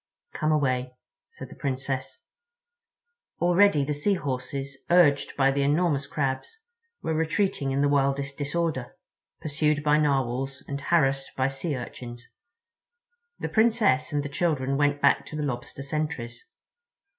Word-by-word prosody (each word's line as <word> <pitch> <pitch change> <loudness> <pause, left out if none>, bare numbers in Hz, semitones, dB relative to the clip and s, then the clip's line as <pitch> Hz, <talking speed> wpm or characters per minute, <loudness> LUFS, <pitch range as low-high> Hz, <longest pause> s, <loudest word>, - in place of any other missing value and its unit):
"Come 155 -1 0
away," 130 -4 0 0.3
said - - -10
the - - -11
Princess. 130 -5 -4 1.2
Already 175 -4 +4
the 150 - -1
Sea 195 +8 +1
Horses, 135 -2 -4
urged 165 -5 +4
by 135 -1 +4
the 140 +1 0
enormous 145 0 +1
Crabs, 135 - -3 0.4
were 160 - -1
retreating 160 -2 0
in 135 +1 0
the 145 - +4
wildest 140 0 +1
disorder, 145 -3 -2 0.5
pursued 150 -1 0
by 150 0 +4
Narwhals 135 -2 0
and 140 0 -4
harassed 135 -5 +1
by 130 0 +2
Sea 140 +3 -3
Urchins. 120 0 -8 1.1
The - - -4
Princess 220 - +3
and 145 -1 0
the - - -3
children 140 -3 0
went 145 0 +1
back - - +4
to - - -7
the 150 - -2
Lobster 135 0 -4
sentries. 140 -5 -4
140 Hz, 135 wpm, -26 LUFS, 135-155 Hz, 1.2 s, Already